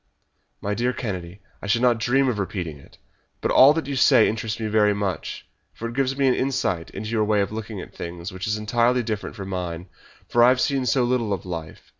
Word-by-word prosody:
"My 100 - -2
dear 120 +4 0
Kennedy, 95 -4 -5 0.2
I - - -6
should 115 +4 +2
not 120 -2 +4
dream 130 +5 +2
of 120 -5 0
repeating 90 -6 -4
it. - - -18 0.4
But - - -1
all 135 +2 +8
that 160 -1 -2
you 140 0 -3
say 130 -3 +5
interests 110 0 -3
me 110 - -3
very 105 -1 +3
much, 95 -5 -4 0.3
for 115 - -5
it 115 - -6
gives 135 +1 0
me 140 - +2
an 130 - +4
insight 100 -12 -1
into 110 +3 -6
your 110 -2 +2
way 105 -1 +2
of 100 - -2
looking 110 -1 -6
at - - -11
things, 85 +2 -6
which 95 +1 -5
is 105 0 0
entirely 120 +3 +1
different 110 -2 -4
from 100 -3 -7
mine, 90 -1 -4 0.4
for 120 - +4
I 120 - +8
have 130 0 +3
seen 135 -1 +1
so 125 +2 +3
little 120 -3 0
of 95 - -5
life. 80 -3 -6
110 Hz, 230 wpm, -24 LUFS, 95-125 Hz, 0.4 s, all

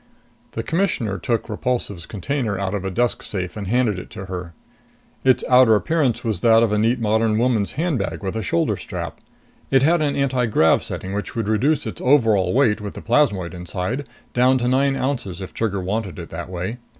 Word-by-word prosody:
The 115 - -3
Commissioner 145 - -1
took 115 +4 -1
Repulsive's 105 -6 -3
container 110 0 -2
out 95 0 -2
of 100 -2 -2
a 95 - -2
desk 120 +6 0
safe 95 0 -4
and 100 -3 -5
handed 115 -3 +1
it - - -10
to 95 - -8
her. 90 -3 -6 0.7
Its 130 -1 +3
outer 125 -3 +6
appearance 145 0 +1
was 110 -6 -2
that 115 -1 +5
of 115 - +1
a 105 - +2
neat 115 +4 +2
modern 110 0 +2
woman's 115 -4 +1
handbag 155 -9 -2
with 95 +2 -3
a 110 - -1
shoulder 85 -4 0
strap. - - -6 0.5
It 135 -1 +4
had 165 +3 +3
an 145 -2 0
antigrav 125 - +2
setting 95 +1 -5
which 105 +1 -4
would 115 -3 -2
reduce 130 +8 +1
its - - -6
overall 115 -8 +3
weight, 115 -5 +2
with 100 -1 -6
the - - -7
plasmoid 110 -9 +1
inside, 90 +9 -4 0.3
down 130 +2 +4
to 120 -1 -1
nine 135 +2 +2
ounces 125 -10 -2
if 95 - -7
Trigger 100 -4 -1
wanted 100 0 -3
it 85 -2 -8
that 85 +2 -6
way. 95 +6 -4
110 Hz, 195 wpm, -21 LUFS, 95-130 Hz, 0.7 s, outer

